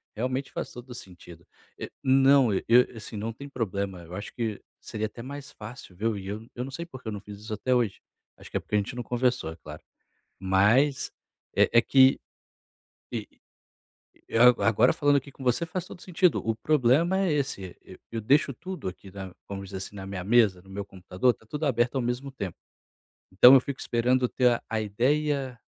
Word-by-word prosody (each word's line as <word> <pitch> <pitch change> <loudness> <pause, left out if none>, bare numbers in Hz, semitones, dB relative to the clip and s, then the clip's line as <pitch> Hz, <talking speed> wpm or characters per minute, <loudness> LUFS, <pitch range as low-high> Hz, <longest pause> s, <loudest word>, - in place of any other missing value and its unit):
realmente 130 +4 -2
faz - - -5
todo 125 +1 -10
sentido, 90 -7 -13 0.3
eh, - - -5
não 135 -1 +5 0.5
assim, 110 0 -9
não 110 +2 -3
tem 140 +5 -10
problema 100 -7 -3
eu 85 +1 -12
acho 100 - -7
que 110 -4 -3 0.2
seria 110 0 -4
até 115 - -11
mais 140 +2 -8
fácil 110 -3 -11
ver, 110 +4 -1
e 95 - -8
eu 110 +4 -6
não 135 - -8
sei 170 +5 -5
porque 130 -8 -11
eu 110 - -2
não 100 - -6
fiz 105 0 -10
isso 110 +1 -7
até 125 +5 0
hoje, 120 -6 0 0.4
acho - - -14
que - - 0
é - - 0
porque - - -4
a - - +5
gente 105 +5 -2
não 125 - -4
conversou 120 -8 0
é 80 - -9
claro, 75 -2 -11 0.6
mas, 105 +9 +3 0.4
eh - - +4
eh, 115 - +7
que 130 0 +5 2.4
agora 115 +2 +4
falando 145 0 +3
aqui 140 0 -3
com 130 - -11
você 125 +7 +1
faz 175 +1 -4
todo - - -11
o - - -17
sentido, 180 -1 +2
o 115 - +1
problema 150 - +2
é 190 -4 +1
esse, 130 -11 -3
eu 95 - -13
eu 115 - -3
deixo 140 +4 +3
tudo 185 - -6
aqui 95 +1 -10
na 95 -1 -8 0.2
vamos 100 -1 -6
dizer, 95 +1 -7
assim, 95 +2 -8
na 95 -1 -7
minha 95 -2 -5
mesa, 105 -5 +3
no 95 - -17
meu 100 +1 -5
computador, 95 +4 0
tá - - -24
tudo 150 +6 -3
aberto 125 -1 +1
ao 130 - +1
mesmo 125 +3 -3
tempo, 100 -9 -6 0.8
então 125 +7 +8
eu 135 - +9
fico 140 0 -6
esperando 125 +2 +1
ter 125 -2 +2
a 110 -1 -1
ideia 130 +4 0
120 Hz, 195 wpm, -27 LUFS, 100-135 Hz, 2.4 s, eu